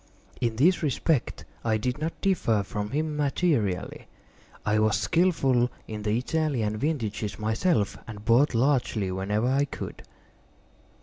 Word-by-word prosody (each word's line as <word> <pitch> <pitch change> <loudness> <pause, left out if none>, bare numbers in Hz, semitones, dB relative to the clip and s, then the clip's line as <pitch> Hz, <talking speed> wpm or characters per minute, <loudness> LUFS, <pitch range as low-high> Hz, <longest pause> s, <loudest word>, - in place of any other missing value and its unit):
In 115 -2 0
this 170 +10 +3
respect 150 -1 0 0.2
I 110 -1 +2
did 125 +6 -2
not 160 +2 -3
differ 120 - +2
from 105 +1 -4
him 150 +4 -1
materially: 140 - 0 0.6
I 105 0 +2
was 110 -1 +3
skilful 135 -9 +2 0.2
in 105 -1 -5
the 105 +1 0
Italian 125 -6 -1
vintages 110 -7 -2
myself, 110 - 0
and 105 -2 -9
bought 125 +3 +4
largely 120 -6 +1
whenever 100 +4 -1
I 135 +3 +2
could. - - -7
120 Hz, 130 wpm, -27 LUFS, 105-150 Hz, 0.6 s, bought